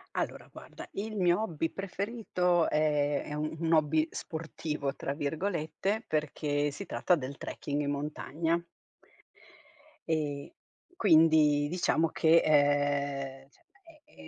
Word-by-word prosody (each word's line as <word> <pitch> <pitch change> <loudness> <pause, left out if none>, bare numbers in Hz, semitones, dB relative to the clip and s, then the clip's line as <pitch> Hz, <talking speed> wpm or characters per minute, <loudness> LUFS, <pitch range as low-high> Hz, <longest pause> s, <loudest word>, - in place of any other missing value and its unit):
Allora, - - -3
guarda, - - -11
il 215 +2 -4
mio 180 +1 +3
hobby 165 -6 -2
preferito 195 -3 0
è 150 -1 +1
è - - -7
un 155 +1 -3
un 165 0 +1
hobby 155 +1 +3
"sportivo," 155 -3 -4
tra 140 - -3
virgolette, 165 +7 -2
perché 145 -1 -1
si 200 - -7
tratta 180 - +2
del 140 -2 -6
trekking 145 0 -4
in 145 0 -1
montagna. 155 +3 -2 1.5
Ehm, 145 -3 -1 0.5
quindi 155 - +5
diciamo 165 -1 +1
che, 165 0 +4
ehm, 140 -2 +1
cioè - - -29 0.4
è - - -18
155 Hz, 120 wpm, -30 LUFS, 145-170 Hz, 1.5 s, quindi